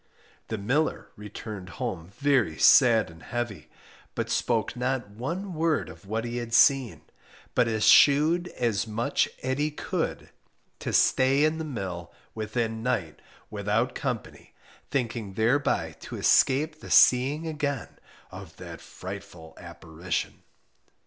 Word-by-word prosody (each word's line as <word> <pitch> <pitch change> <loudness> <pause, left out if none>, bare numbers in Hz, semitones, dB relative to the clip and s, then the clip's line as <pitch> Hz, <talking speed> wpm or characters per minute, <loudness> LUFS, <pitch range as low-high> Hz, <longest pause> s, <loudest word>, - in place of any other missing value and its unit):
The 110 - -3
miller 135 +10 -1
returned 105 -2 -8
home 95 -10 -4
very 135 - +2
sad 115 - +5
and 80 0 -16
heavy, 120 -4 -5 0.5
but - - -3
spoke 115 -2 0
not 125 -3 -2
one 170 - -5
word 160 -1 0
of 80 +4 -14
what 110 +3 -2
he 120 0 -4
had 120 -1 -2
seen, 135 -2 +4 0.5
but 120 - +3
eschewed 145 +10 +5
as 115 -3 0
much 110 +2 0
at 130 +2 -1
he 150 +1 +1
could 150 - -4 0.5
to - - -4
stay 135 +2 +3
in 155 +1 +1
the - - -3
mill 95 - -6 0.2
within 110 +1 -3
night 110 -10 -2 0.3
without - - -1
company, - - -5 0.3
thinking 115 -6 -3
thereby 120 +7 +1
to - - -8
escape 155 +4 +3
the - - -11
seeing 135 +6 +4
again 145 -5 -4 0.3
of - - -11
that - - -9
frightful 95 -4 -10
apparition. 85 +2 -5
120 Hz, 130 wpm, -27 LUFS, 105-140 Hz, 0.5 s, sad